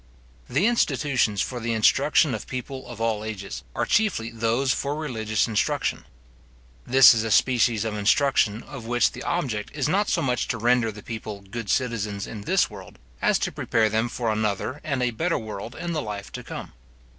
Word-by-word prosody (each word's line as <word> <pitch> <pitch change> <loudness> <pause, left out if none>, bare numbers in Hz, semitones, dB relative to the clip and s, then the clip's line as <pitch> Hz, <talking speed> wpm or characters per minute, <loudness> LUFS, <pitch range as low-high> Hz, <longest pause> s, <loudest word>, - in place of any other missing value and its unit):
The 135 +10 +2
institutions 135 - +2
for 125 - -5
the 115 0 -2
instruction 135 +5 +3
of 110 - -5
people 130 +1 -6
of 120 -2 -9
all 115 -2 0
ages, 105 -3 -6
are - - 0
chiefly 190 - +1
those 115 +4 +1
for 140 +3 -2
religious 110 -9 -1
instruction. 110 -2 -1 0.8
This 130 0 +8
is 110 -1 0
a 115 - -2
species 115 -2 +3
of 110 - -2
instruction, 115 0 +2
of 135 -5 -9
which 120 0 +2
the - - -9
object 130 -12 -2
is 145 -2 0
not 200 +6 +1
so 170 - +1
much 125 -3 0
to 120 - -2
render 120 0 +2
the 105 0 -12
people 110 -3 -6
good 100 +2 -7
citizens 110 -6 -1
in 110 - -7
this - - +2
world, - - -12 0.2
as - - +3
to - - -2
prepare 110 -1 +1
them 110 +3 0
for 115 -1 -1
another 110 +6 -2
and 140 -5 -1
a 125 - +1
better 165 +9 0
world 110 +2 -7
in 175 -1 -4
the 155 - -1
life 105 -3 -6
to - - -6
come. - - -8
115 Hz, 190 wpm, -25 LUFS, 110-135 Hz, 0.8 s, This